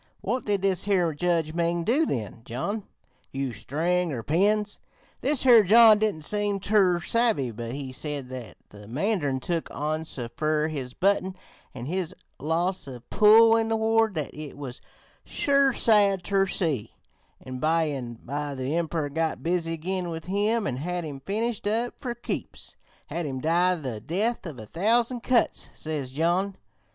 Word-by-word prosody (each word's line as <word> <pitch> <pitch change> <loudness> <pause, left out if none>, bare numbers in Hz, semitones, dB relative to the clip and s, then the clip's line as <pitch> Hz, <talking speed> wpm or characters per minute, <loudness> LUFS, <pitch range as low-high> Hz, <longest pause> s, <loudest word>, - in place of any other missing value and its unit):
What 255 - -2
did 200 -2 0
this 190 -2 +1
here 180 -5 +2
Judge 165 0 0
Ming 170 0 0
do 285 - +2
then, 115 -2 -4
John? 195 - -4 0.4
Use 135 -5 -3
string 170 +8 0
or 120 -5 -4
pins?' 205 - +1 0.4
This 280 0 0
here 240 -4 +8
John 215 +2 +7
didn't 210 -8 0
seem 205 +3 -1
ter 195 -3 +3
savvy, 220 - +2
but 115 +1 -6
he 135 -1 -5
said 140 0 -4
that 120 -9 -8
the 105 0 -13
mandarin 145 - 0
took 165 +5 -2
on 155 +2 -2
so 125 -6 -5
fer 155 0 +1
his 130 -5 -5
button 190 -1 +1 0.4
an' 120 -1 -6
his 180 +3 -3 0.2
loss 170 +4 -1
of 125 -3 -10
pull 225 +2 +7
in 225 0 +1
the 225 - +2
ward 220 -2 +2
that 150 -3 -3
it 150 -2 -8
was 135 -3 -7 0.4
sure 275 -1 +2
sad 205 -6 +3
ter 195 0 +2
see, 150 - -1 0.4
an' 130 0 -7
by 160 +3 +2
an' 130 -6 -4
by 145 +2 -3
the 130 +1 -3
Emprer 165 -2 -1
got 160 0 -1
busy 165 -1 0
again 180 +2 -3
with 160 -1 -6
him 205 +4 0
an' 130 -9 -2
had 175 +5 -3
him 145 -4 -6
finished 210 - -2
up 230 +3 0
fer 240 -2 -4
keeps; 240 - -6 0.3
had 170 -2 -4
him 130 -2 -4
die 175 +5 +2
the 130 -9 -5
'death 195 - -1
of 150 -6 -7
a 110 - -8
thousand 230 - +1
cuts,' 245 0 +1
says 150 -4 -4
John. 175 +7 0
170 Hz, 170 wpm, -26 LUFS, 145-205 Hz, 0.4 s, here